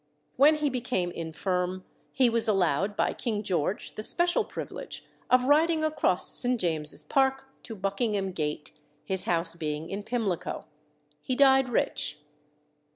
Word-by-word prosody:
When 295 Hz, +4 st, +6 dB
he 300 Hz, -2 st, 0 dB
became 240 Hz, -8 st, -1 dB
infirm 180 Hz, +3 st, -2 dB, 0.3 s
he 255 Hz, -2 st, +3 dB
was 230 Hz, -1 st, +2 dB
allowed 195 Hz, -1 st, +1 dB
by -, -, +1 dB
King 215 Hz, -4 st, -3 dB
George 180 Hz, 0 st, -1 dB
the -, -, -5 dB
special 345 Hz, +10 st, +2 dB
privilege -, -, -7 dB, 0.2 s
of 255 Hz, 0 st, +5 dB
riding 310 Hz, +4 st, +3 dB
across 305 Hz, -12 st, 0 dB
St. 245 Hz, -1 st, 0 dB
James's 155 Hz, -4 st, -1 dB
Park 270 Hz, -, +1 dB, 0.2 s
to 225 Hz, -, -8 dB
Buckingham 195 Hz, 0 st, -1 dB
Gate, 150 Hz, -3 st, -3 dB, 0.3 s
his 190 Hz, -1 st, -1 dB
house 165 Hz, -1 st, +1 dB
being 155 Hz, -1 st, -4 dB
in 200 Hz, +1 st, -3 dB
Pimlico. 205 Hz, -5 st, -2 dB, 0.6 s
He 255 Hz, -, -2 dB
died 265 Hz, -1 st, +5 dB
rich. 240 Hz, -, 0 dB
205 Hz, 140 wpm, -28 LUFS, 175-255 Hz, 0.6 s, When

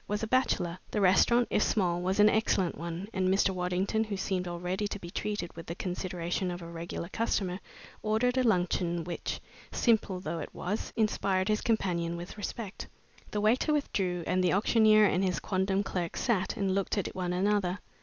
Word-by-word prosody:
was 210 Hz, +1 st, -2 dB
a -, -, -1 dB
bachelor. 200 Hz, -8 st, +1 dB
The 210 Hz, -, -1 dB
restaurant, 205 Hz, +5 st, +4 dB
if -, -, +2 dB
small, 175 Hz, -5 st, +1 dB
was 190 Hz, +3 st, 0 dB
an 210 Hz, -, +8 dB
excellent 215 Hz, -5 st, +2 dB
one, 170 Hz, +3 st, -5 dB
and 185 Hz, -1 st, +1 dB
Mr. 195 Hz, 0 st, +3 dB
Waddington, 185 Hz, +4 st, 0 dB
who 205 Hz, -2 st, -4 dB
seemed 185 Hz, -1 st, -1 dB
already 180 Hz, +4 st, -2 dB
to 205 Hz, -, -5 dB
be 175 Hz, -3 st, -9 dB
treated 205 Hz, -3 st, -3 dB
with 165 Hz, -, -9 dB
the 170 Hz, -, -4 dB
consideration 180 Hz, 0 st, -2 dB
of 175 Hz, 0 st, -5 dB
a -, -, -7 dB
regular 170 Hz, 0 st, -5 dB
customer, 190 Hz, -3 st, -1 dB, 0.4 s
ordered 220 Hz, +4 st, +1 dB
a 260 Hz, -, +3 dB
luncheon 175 Hz, -5 st, +1 dB
which, 170 Hz, +1 st, -4 dB, 0.3 s
simple 215 Hz, -6 st, +2 dB
though 170 Hz, -1 st, -4 dB
it 150 Hz, -, -7 dB
was, 205 Hz, +5 st, -3 dB
inspired 200 Hz, -3 st, +1 dB
his 215 Hz, 0 st, +2 dB
companion 170 Hz, -6 st, 0 dB
with 175 Hz, +1 st, -8 dB
respect. 210 Hz, 0 st, -6 dB, 0.4 s
The 210 Hz, -, -2 dB
waiter 235 Hz, +8 st, +3 dB
withdrew 185 Hz, -, -1 dB
and 185 Hz, +1 st, +1 dB
the 180 Hz, -, +3 dB
auctioneer 215 Hz, +1 st, +5 dB
and 190 Hz, -1 st, +2 dB
his 185 Hz, -2 st, 0 dB
quondam 190 Hz, +1 st, 0 dB
clerk 175 Hz, -4 st, -3 dB
sat 195 Hz, -6 st, 0 dB
and 195 Hz, -2 st, +1 dB
looked 195 Hz, +2 st, 0 dB
at 200 Hz, -, -2 dB
one 180 Hz, -1 st, -2 dB
another. 190 Hz, 0 st, +1 dB
190 Hz, 185 wpm, -30 LUFS, 180-210 Hz, 0.4 s, an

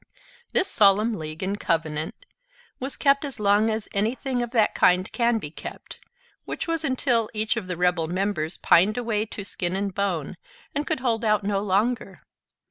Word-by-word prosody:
This 380 Hz, -, +2 dB
solemn 210 Hz, +2 st, +4 dB
league 155 Hz, -3 st, -6 dB
and 200 Hz, +2 st, -2 dB
covenant 160 Hz, -, -2 dB, 0.5 s
was 265 Hz, +1 st, -4 dB
kept 280 Hz, 0 st, +3 dB
as 280 Hz, -5 st, -6 dB
long 205 Hz, +2 st, +3 dB
as 220 Hz, -1 st, -2 dB
anything 245 Hz, +5 st, -1 dB
of 240 Hz, -, -2 dB
that 225 Hz, -3 st, +2 dB
kind 180 Hz, +1 st, +3 dB
can 235 Hz, -1 st, +2 dB
be 150 Hz, -9 st, -6 dB
kept, -, -, -9 dB, 0.5 s
which -, -, -4 dB
was 330 Hz, -1 st, -1 dB
until 250 Hz, -5 st, +1 dB
each 215 Hz, +2 st, +1 dB
of 220 Hz, -5 st, -4 dB
the 180 Hz, -2 st, -3 dB
rebel 180 Hz, -2 st, +1 dB
members 180 Hz, -2 st, -1 dB
pined 195 Hz, +6 st, +4 dB
away 225 Hz, -3 st, -1 dB
to 205 Hz, -, -7 dB
skin 180 Hz, -2 st, -2 dB
and 195 Hz, 0 st, -2 dB
bone, 185 Hz, -4 st, -2 dB, 0.4 s
and 290 Hz, +2 st, -2 dB
could 315 Hz, -5 st, -1 dB
hold 235 Hz, -3 st, 0 dB
out 215 Hz, -1 st, +2 dB
no 200 Hz, 0 st, 0 dB
longer. 210 Hz, +5 st, -1 dB
210 Hz, 175 wpm, -25 LUFS, 185-240 Hz, 0.5 s, solemn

